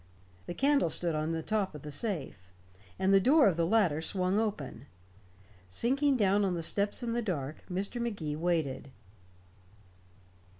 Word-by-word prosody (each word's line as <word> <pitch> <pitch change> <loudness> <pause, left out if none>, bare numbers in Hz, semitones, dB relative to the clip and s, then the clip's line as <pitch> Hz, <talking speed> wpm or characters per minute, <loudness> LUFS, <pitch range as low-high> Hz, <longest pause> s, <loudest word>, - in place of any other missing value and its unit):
The 175 - -5
candle 280 - +3
stood 170 +1 0
on 155 +1 -1
the 165 -1 -2
top 205 -6 -1
of 150 - -9
the 150 - -7
safe, 145 - -4 0.5
and 190 +1 +2
the 195 - +7
door 275 +7 +5
of 185 - +2
the 165 0 +1
latter 180 -7 +2
swung 185 +3 0
open. 150 - -4 0.8
Sinking 270 - +1
down 205 -1 +3
on 190 -2 0
the 165 - -3
steps 205 +7 0
in 230 -1 -2
the 240 - 0
dark, 155 - -4
Mr. 200 +6 -3
Magee 195 -11 -3
waited. 160 -5 -1
185 Hz, 160 wpm, -30 LUFS, 155-220 Hz, 0.8 s, the